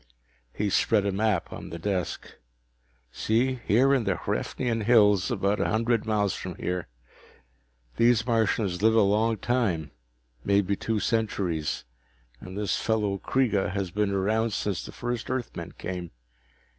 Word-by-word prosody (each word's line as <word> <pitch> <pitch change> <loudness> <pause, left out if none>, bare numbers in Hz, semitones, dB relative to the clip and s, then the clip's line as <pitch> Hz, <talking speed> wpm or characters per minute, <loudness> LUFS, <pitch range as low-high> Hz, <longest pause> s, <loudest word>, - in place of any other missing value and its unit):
He 100 +8 -2
spread 105 0 +3
a 100 - +1
map 100 -2 0
on - - -8
the 85 - -6
desk. 95 +1 -3 0.8
"See, 120 - 0
here 130 +6 +4
in 130 -4 +2
the 100 -3 0
Hraefnian 115 -4 -2
Hills, 105 -4 +5
about 100 -3 0
a - - +1
hundred 115 0 +1
miles 105 -2 +1
from 90 -1 -6
here. 90 -1 -3 1.1
These 115 -1 +4
Martians 110 -6 +1
live 110 +1 +4
a 110 - +6
long 110 +3 +2
time, 100 -9 0 0.5
maybe 100 0 +2
two 110 +2 -1
centuries, 100 -8 -1 0.6
and 95 +6 -9
this 105 -2 0
fellow 105 -3 0
Kreega 105 -7 +1
has 100 -3 -2
been 105 +2 0
around 105 +3 0
since 100 -3 -2
the - - -8
first 120 -1 -4
Earthmen 130 -2 -4
came. 90 -2 -5
105 Hz, 145 wpm, -27 LUFS, 95-115 Hz, 1.1 s, a